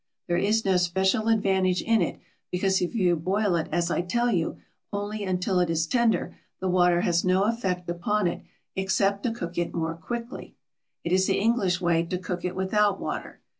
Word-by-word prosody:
There 175 Hz, -, 0 dB
is 210 Hz, +5 st, +1 dB
no 190 Hz, -2 st, +3 dB
special 190 Hz, +5 st, +1 dB
advantage 190 Hz, -4 st, +2 dB
in 225 Hz, -2 st, +3 dB
it, 170 Hz, -, -2 dB, 0.3 s
because 190 Hz, +1 st, +1 dB
if 180 Hz, +5 st, -2 dB
you 180 Hz, -5 st, +3 dB
boil 190 Hz, +4 st, 0 dB
it 165 Hz, -, -1 dB
as 170 Hz, +1 st, 0 dB
I -, -, +1 dB
tell 235 Hz, +7 st, 0 dB
you, 170 Hz, -5 st, -1 dB, 0.3 s
only 205 Hz, +1 st, -3 dB
until 185 Hz, 0 st, 0 dB
it 175 Hz, -1 st, +1 dB
is 165 Hz, -1 st, +1 dB
tender, 235 Hz, +5 st, +1 dB, 0.2 s
the 190 Hz, -, -2 dB
water 180 Hz, -1 st, +3 dB
has 175 Hz, -3 st, +1 dB
no 185 Hz, +1 st, +3 dB
effect 195 Hz, -5 st, -1 dB
upon 180 Hz, +4 st, 0 dB
it 175 Hz, -, -1 dB, 0.3 s
except 195 Hz, +1 st, +1 dB
to 240 Hz, -, -1 dB
cook 175 Hz, -7 st, -4 dB
it 175 Hz, -, -2 dB
more 165 Hz, -1 st, -1 dB
quickly. 235 Hz, +9 st, -7 dB, 0.5 s
It 170 Hz, -, -3 dB
is 185 Hz, +1 st, +3 dB
the 195 Hz, -, +2 dB
English 195 Hz, -4 st, +1 dB
way 170 Hz, -2 st, +2 dB
to 170 Hz, +2 st, -3 dB
cook 180 Hz, -1 st, -5 dB
it 180 Hz, 0 st, -3 dB
without 200 Hz, +1 st, +1 dB
water. -, -, -5 dB
185 Hz, 195 wpm, -26 LUFS, 175-205 Hz, 0.5 s, no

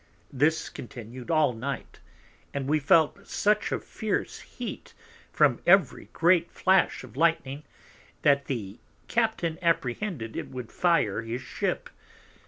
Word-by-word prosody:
This 150 Hz, +5 st, +2 dB
continued 120 Hz, 0 st, -9 dB
all 155 Hz, -6 st, +3 dB
Night; 135 Hz, +5 st, -5 dB, 0.6 s
and 140 Hz, -1 st, -2 dB
we 155 Hz, +2 st, +2 dB
felt 160 Hz, +5 st, +3 dB
such 210 Hz, 0 st, +1 dB
a -, -, 0 dB
fierce 215 Hz, -2 st, -3 dB
Heat -, -, -8 dB, 0.4 s
from -, -, +3 dB
every -, -, +4 dB
great 170 Hz, 0 st, +3 dB
Flash 190 Hz, -6 st, +2 dB
of 125 Hz, -2 st, -13 dB
Lightning, 150 Hz, -3 st, +1 dB, 0.6 s
that 140 Hz, -2 st, +4 dB
the 110 Hz, -5 st, -5 dB, 0.3 s
Captain 220 Hz, -8 st, 0 dB
apprehended 160 Hz, -, -1 dB
it -, -, -4 dB
would 125 Hz, -3 st, -7 dB
fire 165 Hz, -, +2 dB
his 115 Hz, +2 st, -5 dB
Ship. -, -, -2 dB
145 Hz, 125 wpm, -27 LUFS, 125-170 Hz, 0.6 s, every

